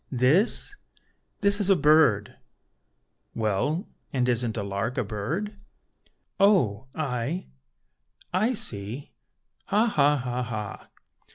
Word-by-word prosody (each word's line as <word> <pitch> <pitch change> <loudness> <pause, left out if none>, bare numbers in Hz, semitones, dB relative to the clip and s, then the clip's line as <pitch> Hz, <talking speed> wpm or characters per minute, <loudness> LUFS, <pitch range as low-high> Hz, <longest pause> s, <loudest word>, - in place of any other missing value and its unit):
"This? 145 - +2 0.7
This 200 +1 +3
is 200 -2 +1
a 195 - +6
bird." 150 - +4 1.0
"Well, 115 - -1 0.2
and 125 -2 0
isn't 120 -2 +1
a 100 - -2
lark 100 +5 -3
a 125 - +1
bird?" 160 - -4 0.8
"O, 130 - +3
ay! 140 +2 -3 0.8
I 220 +7 +2
see! 110 - -3 0.5
ha! 215 +3 +2
ha! 150 -9 +3
ha! 125 -1 -3
ha!" 110 -4 -6
130 Hz, 105 wpm, -26 LUFS, 110-185 Hz, 1.0 s, a